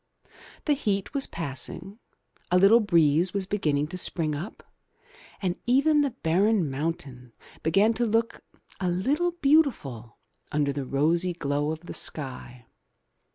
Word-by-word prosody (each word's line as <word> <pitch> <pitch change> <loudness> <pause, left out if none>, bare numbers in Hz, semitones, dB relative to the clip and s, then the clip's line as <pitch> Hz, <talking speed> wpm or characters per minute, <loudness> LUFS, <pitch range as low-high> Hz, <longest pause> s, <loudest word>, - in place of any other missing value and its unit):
The 300 - +3
heat 205 -7 -2
was 275 -1 -1
passing, 170 - -4 0.5
a 180 - +3
little 200 +5 +6
breeze 170 -3 +2
was 195 -1 -1
beginning 150 -8 0
to 185 +1 -4
spring 160 -4 0
up, 170 +9 -7 0.8
and 180 -1 -1
even 285 +4 +4
the 285 - +1
barren 195 - +1
mountain 135 -5 -5 0.3
began 195 +8 +3
to 235 +1 -1
look 230 +1 0 0.4
a 185 -2 0
little 275 - +1
beautiful 275 - +1 0.3
under 145 -1 0
the 140 -1 -4
rosy 170 +7 +1
glow 145 -2 -1
of 160 0 -6
the 170 - -9
sky. 125 -4 -3
175 Hz, 135 wpm, -26 LUFS, 145-220 Hz, 0.8 s, little